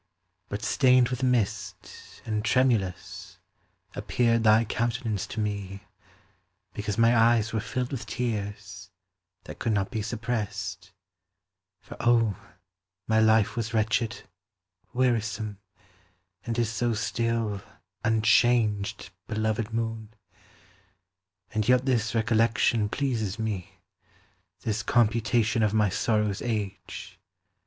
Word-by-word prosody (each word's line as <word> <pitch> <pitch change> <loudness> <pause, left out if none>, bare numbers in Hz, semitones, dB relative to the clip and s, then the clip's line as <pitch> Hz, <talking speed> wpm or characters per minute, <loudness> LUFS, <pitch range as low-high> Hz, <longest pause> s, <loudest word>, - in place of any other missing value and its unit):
But 100 +3 -4
stained 125 +1 +4
with 125 0 -3
mist, 105 -7 -2
and 105 -1 -2
tremulous, 110 -6 0 0.6
appeared 115 -2 +1
Thy 110 +1 +5
countenance 115 -2 -2
to 110 - -6
me, 100 -2 -3 0.9
because 105 0 -3
my 115 +1 +5
eyes 115 -1 +3
Were 110 - +1
filled 120 +4 -3
with 135 - -5
tears, 100 -6 -4 0.5
that - - -10
could 115 - 0
not 100 -2 -1
be 110 - -2
suppressed; 105 -5 -4 0.9
For, - - -11
oh, 115 -4 +3 0.7
my 110 0 +3
life 110 +1 +4
was 115 -1 -3
wretched, 110 +1 0 0.7
wearisome, 110 -5 -1 0.9
And 115 0 -2
is 115 -2 +1
so 115 +1 0
still, 115 -2 -1 0.4
unchanged, 110 -3 +2 0.2
belovèd 110 0 -1
moon! 115 -1 -3 1.4
And 110 +1 -1
yet 125 0 +4
this 120 -3 0
recollection 115 -1 +2
pleases 115 -7 -1
me, 105 -5 -4 0.8
This 110 0 -1
computation 115 0 +2
of 105 0 +2
my 105 -2 +3
sorrow's 105 +1 0
age. 105 -5 -5
110 Hz, 105 wpm, -27 LUFS, 105-115 Hz, 1.4 s, Thy